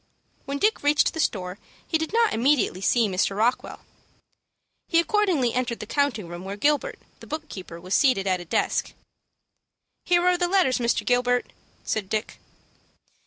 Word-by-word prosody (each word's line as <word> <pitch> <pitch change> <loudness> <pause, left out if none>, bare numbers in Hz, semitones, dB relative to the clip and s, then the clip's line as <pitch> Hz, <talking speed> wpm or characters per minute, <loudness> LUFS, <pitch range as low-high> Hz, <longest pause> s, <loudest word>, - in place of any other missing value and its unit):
When 280 +1 -3
Dick 425 +9 +1
reached 290 +1 +3
the 320 - -6
store, 185 -8 -2 0.3
he 320 - 0
did 320 - -3
not 460 0 +2
immediately 235 -6 +1
see 230 +3 +3
Mr. 195 +1 -1
Rockwell. 235 +4 0 1.1
He 335 - +3
accordingly 340 - +1
entered 245 -2 -2
the - - -6
counting 245 -6 -1
room 175 +1 -8
where 195 +1 -6
Gilbert, 295 +5 +1 0.2
the - - -13
book 310 0 -5
keeper, 180 -3 -9
was 185 +3 -5
seated 255 -9 +3
at 185 -1 +1
a - - -9
desk. 165 - -1 1.1
"Here 350 0 +3
are 360 -1 +3
the 355 - +2
letters, 350 -10 +2
Mr. 235 -1 0
Gilbert," 245 0 +1 0.3
said 205 -3 -3
Dick. 215 +1 -3
245 Hz, 165 wpm, -25 LUFS, 200-315 Hz, 1.1 s, reached